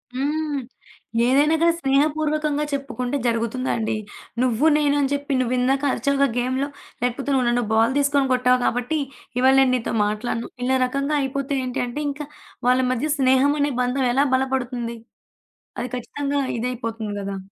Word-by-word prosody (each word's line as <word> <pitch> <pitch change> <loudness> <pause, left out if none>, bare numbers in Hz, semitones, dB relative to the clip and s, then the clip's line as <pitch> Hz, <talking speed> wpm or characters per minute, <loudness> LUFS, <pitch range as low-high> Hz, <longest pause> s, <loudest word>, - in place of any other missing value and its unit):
హ్మ్. 295 +1 -1 0.7
ఏదైనా 290 +5 +4
కానీ 335 0 +4
స్నేహపూర్వకంగా 300 +2 +1
చెప్పుకుంటే 275 -1 -2
జరుగుతుందా 230 +2 -1
అండి, 220 0 -1 0.5
నువ్వు 255 +3 +2
నేను 290 -1 +2
అని 275 0 0
చెప్పి 285 0 -2
నువ్వు 250 0 0
ఇందాక 270 +3 +1
అరిచావుగా 280 0 +2
గేమ్‌లో. 260 +3 0 0.3
లేకపోతే 250 +3 -1
నువ్వు 255 -2 +2
నన్ను 240 0 +1
బాల్ 225 +3 +3
తీసుకొని 280 -1 +2
కొట్టావు 250 0 +3
కాబట్టి 250 +6 0 0.4
ఇవాళ 265 +1 +5
నేను 260 -1 +4
నీతో 245 - -2
మాట్లాడను, 215 +2 -3
ఇలా 260 +1 +2
రకంగా 275 +3 -1
అయిపోతే 275 +1 -2
ఏంటి 255 +1 -2
అంటే 245 +5 -5
ఇంకా 285 +1 -6 0.4
వాళ్ళ 250 +1 +4
మధ్య 255 +5 -1
స్నేహం 265 +1 +4
అనే 285 0 +1
బంధం 250 +2 0
ఎలా 275 +2 +3
బలపడుతుంది? 250 -3 -2 0.8
అది 245 - -2
ఖచ్చితంగా 280 +3 -2 0.2
ఇదైయిపోతుంది 230 -3 -3
గదా! 195 0 -4
265 Hz, 145 wpm, -22 LUFS, 245-285 Hz, 0.8 s, ఇవాళ